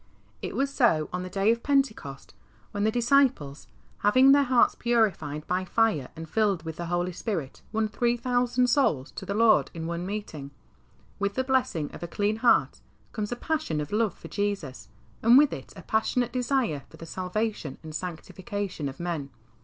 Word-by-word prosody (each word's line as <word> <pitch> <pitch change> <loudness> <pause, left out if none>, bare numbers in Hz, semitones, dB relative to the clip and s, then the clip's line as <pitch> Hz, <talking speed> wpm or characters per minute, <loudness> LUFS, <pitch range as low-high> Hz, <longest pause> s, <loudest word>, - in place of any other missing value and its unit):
It - - -5
was 275 +1 0
so 165 - +2
on 180 - -2
the 185 - -6
day 195 +4 +2
of 230 0 -1
Pentecost, 260 - -1 0.4
when 205 0 -1
the - - +4
disciples, 240 - +2 0.3
having 255 +6 +5
their 285 +1 +6
hearts 250 -2 +4
purified 190 -11 0
by 180 +1 -1
fire 185 - +1
and 165 0 -8
filled 200 -3 +1
with 160 -1 -6
the 170 - -4
Holy 175 +1 -1
Spirit, 175 - -4
won 220 0 0
three 235 +3 0
thousand 245 0 +1
souls 200 - +1
to 190 - -8
the 200 - -2
Lord 225 0 +4
in 165 -1 -5
one 170 +2 -3
meeting. 190 -9 -5 0.7
With 200 0 -1
the 260 - +1
blessing 255 - 0
of - - -9
a 170 - -4
clean 205 +4 -1
heart 240 +1 +3 0.3
comes 210 -1 -4
a - - -1
passion 305 - -2
of 150 - -4
love 215 -2 +1
for - - -11
Jesus, 200 -10 -3 0.3
and 235 +3 +7
with 295 0 +5
it 135 - -8
a 185 - -11
passionate 240 +2 0
desire 250 - 0
for - - -15
the 165 - -9
salvation 185 -3 -3
and 155 -1 -8
sanctification 180 0 -5
of 135 - -11
men. 170 -5 -3
205 Hz, 185 wpm, -27 LUFS, 165-240 Hz, 0.7 s, and